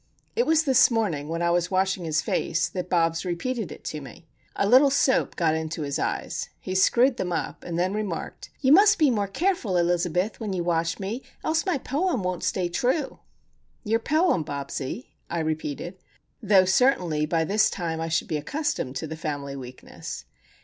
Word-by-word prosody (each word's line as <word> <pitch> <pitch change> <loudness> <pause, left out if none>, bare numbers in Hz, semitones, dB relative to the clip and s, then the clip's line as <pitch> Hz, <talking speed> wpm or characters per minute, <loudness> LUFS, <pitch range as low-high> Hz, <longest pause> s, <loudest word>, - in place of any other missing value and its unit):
It 475 - +1
was 320 0 +4
this 260 -4 +5
morning, 200 - -1
while 165 +2 -2
I 170 - +2
was 175 0 +1
washing 190 -1 0
his 160 0 0
face, 165 0 0
that 180 +1 -5
Bobs 165 -2 +1
repeated 195 +4 -3
it - - -10
to 150 - -5
me. 135 +4 -12 0.3
A 200 - +1
little 260 +5 +7
soap 270 -1 +2
got 160 -2 +2
into 160 0 -3
his 140 -1 -2
eyes. - - -3
He 185 - -5
screwed 240 +7 +4
them 180 -5 -2
up, 170 - -3
and 170 -1 -4
then 185 +2 +1
remarked,— 205 -6 -4
"You 265 -2 +3
must 400 +5 +7
be 305 -6 +4
more 205 -4 0
careful, 240 - 0
Elizabeth, 175 +3 0
when 215 -4 -3
you 180 -2 -1
wash 165 -1 0
me, 205 +6 -4 0.2
else 325 +4 0
my 365 - +2
poem 280 - -1
won't 180 -1 -2
stay 185 -2 0
true." 255 - -1 0.6
"Your 225 0 +1
poem, 310 - +2
Bobsie?" 140 - -5 0.2
I 170 - -3
repeated. 155 +3 -3 0.4
Though, 200 -4 +5
certainly, 180 - +2
by 165 0 +1
this 210 +6 +3
time 165 -3 -3
I 165 - -2
should 160 - 0
be 155 - -1
accustomed 285 - -3
to 145 - -3
the 160 +1 -6
family 145 -3 -4
weakness. 130 -2 -8
180 Hz, 185 wpm, -25 LUFS, 165-245 Hz, 0.6 s, little